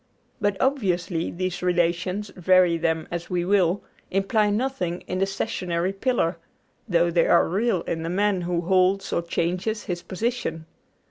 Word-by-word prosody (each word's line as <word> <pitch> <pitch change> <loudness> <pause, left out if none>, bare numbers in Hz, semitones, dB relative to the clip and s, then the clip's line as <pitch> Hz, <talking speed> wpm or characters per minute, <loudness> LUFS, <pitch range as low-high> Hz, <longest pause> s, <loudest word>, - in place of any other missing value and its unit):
But 205 -1 +1
obviously 185 -10 0
these 185 0 -3
relations, 180 +3 0
vary 180 -1 +4
them 160 -1 -1
as 170 0 -4
we 175 -1 0
will, 190 -1 +2 0.3
imply 205 +2 +2
nothing 205 -6 -1
in 185 - -4
the 195 - +2
stationary 185 -2 -2
pillar, 195 -6 0 0.5
though 170 -1 +3
they 170 0 +3
are 170 - +5
real 195 +1 +1
in 165 - -3
the 165 - -3
man 195 +1 +1
who 175 0 -1
holds 185 +2 +2
or - - +1
changes 180 +6 -2
his 175 -1 -4
position. 190 -6 -3
180 Hz, 150 wpm, -24 LUFS, 170-200 Hz, 0.5 s, are